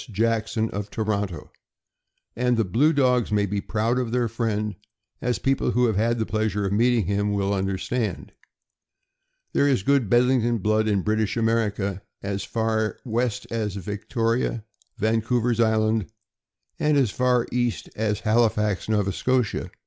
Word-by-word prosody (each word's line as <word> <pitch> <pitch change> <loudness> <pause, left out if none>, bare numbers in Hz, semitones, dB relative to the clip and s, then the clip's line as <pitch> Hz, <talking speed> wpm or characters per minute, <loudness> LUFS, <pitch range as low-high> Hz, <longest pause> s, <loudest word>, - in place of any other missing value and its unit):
Jackson, 110 +1 0
of 105 0 -4
Toronto; 100 -8 -3 0.8
and 125 0 +1
the 115 - +2
blue 125 - +3
dogs 125 -6 +2
may 105 -1 +2
be 100 +1 -2
proud 115 +5 0
of 120 -3 -2
their 120 -1 +1
friend, 110 -2 -2 0.5
as 125 0 0
people 135 0 0
who 125 0 +2
have 110 -3 +1
had 115 +3 +1
the 110 - -1
pleasure 110 -2 -1
of 95 - -1
meeting 115 0 +3
him 100 +2 0
will 100 0 0
understand. 100 +4 -2 1.2
There 140 - +3
is 130 -9 +2
good 140 -4 +2
Bedlington 120 0 +3
blood 110 +1 +1
in 100 -3 +1
British 110 +1 0
America, 105 -4 0 0.2
as 100 0 -3
far 110 -1 -1
west 120 -1 -1
as 110 -4 -2
Victoria, 110 +4 -2 0.3
Vancouver's 115 +2 +1
Island, 110 -3 +2 0.7
and 150 -1 +2
as 130 -7 +2
far 125 0 +2
east 120 -2 -1
as 105 -1 -1
Halifax, 105 -3 +1
Nova 105 -2 +1
Scotia. 125 +2 0
110 Hz, 145 wpm, -24 LUFS, 105-120 Hz, 1.2 s, blue